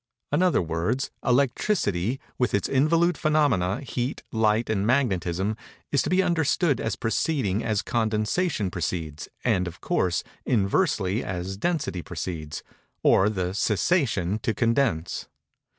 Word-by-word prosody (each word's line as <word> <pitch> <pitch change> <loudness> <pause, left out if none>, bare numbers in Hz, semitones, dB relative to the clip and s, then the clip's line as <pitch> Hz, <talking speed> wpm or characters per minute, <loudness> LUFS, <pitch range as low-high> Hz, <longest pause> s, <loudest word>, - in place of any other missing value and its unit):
In 145 +4 +2
other 180 - +3
words, 85 +11 -1
Electricity, 125 - +1 0.2
with 125 -4 +2
its 100 - 0
involute 165 +6 +3
phænomena, 145 - +1
heat, 125 -1 -3
light 110 0 +2
and 100 -3 0
magnetism, 100 -6 +1 0.4
is 140 - +3
to - - -2
be 185 +1 +3
understood 165 -3 +1
as 110 -2 -1
proceeding 115 - 0
as 110 -2 0
condensation 110 - 0
proceeds, 80 -4 -4
and, 90 -1 +2
of 85 - -8
course, 90 -2 0 0.2
inversely 105 - +1
as 95 +1 -4
density 150 - -1
proceeds, 80 -3 -5 0.4
or 95 +2 +5
the 95 -3 -2
cessation 105 - +1
to 110 0 -1
condense. 115 - 0
110 Hz, 125 wpm, -25 LUFS, 90-140 Hz, 0.4 s, or